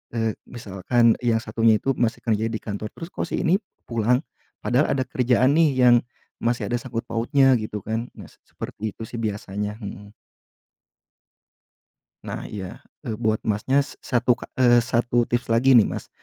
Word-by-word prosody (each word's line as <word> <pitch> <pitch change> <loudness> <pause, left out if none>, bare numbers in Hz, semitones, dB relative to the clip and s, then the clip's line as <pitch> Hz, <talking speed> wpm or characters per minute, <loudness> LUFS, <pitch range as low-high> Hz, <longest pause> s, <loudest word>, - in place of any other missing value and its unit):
eee, 115 -1 +1 0.2
misalkan 115 +1 +1
yang 115 -2 +2
satunya 115 0 +3
itu 135 - +1
masih 115 -1 0
kerja 110 -1 +1
di 110 -1 -3
kantor 105 0 -4
terus, 165 - -8
"Kok - - -3
si - - -2
ini 175 +3 +4 0.3
pulang? 120 +2 +2 0.4
Padahal 125 +8 +2
ada 135 - 0
kerjaan 125 +2 +2
nih 165 -2 +5
yang 125 -1 +6 0.4
masih 120 +1 -1
ada 120 - +2
sangkut 115 -1 -5
pautnya," 130 +3 +3
gitu 110 -1 -5
kan. 110 +2 -2
Nah - - -11
s - - -24
seperti 110 -1 -6
itu - - -8
sih 115 +2 -7
biasanya, 105 -1 -3
mhm. 100 +1 -8 2.1
Nah - - -6
iya 95 -4 -7 0.2
e 110 - -3
buat 110 0 0
Masnya 130 +7 +1
s - - -13
satu 125 0 +2
ka - - -9
eee, 120 -2 +5
1 120 0 +1
tips 120 -1 -1
lagi 125 +3 +5
nih 110 - +7
Mas - - -5
115 Hz, 170 wpm, -23 LUFS, 110-125 Hz, 2.1 s, nih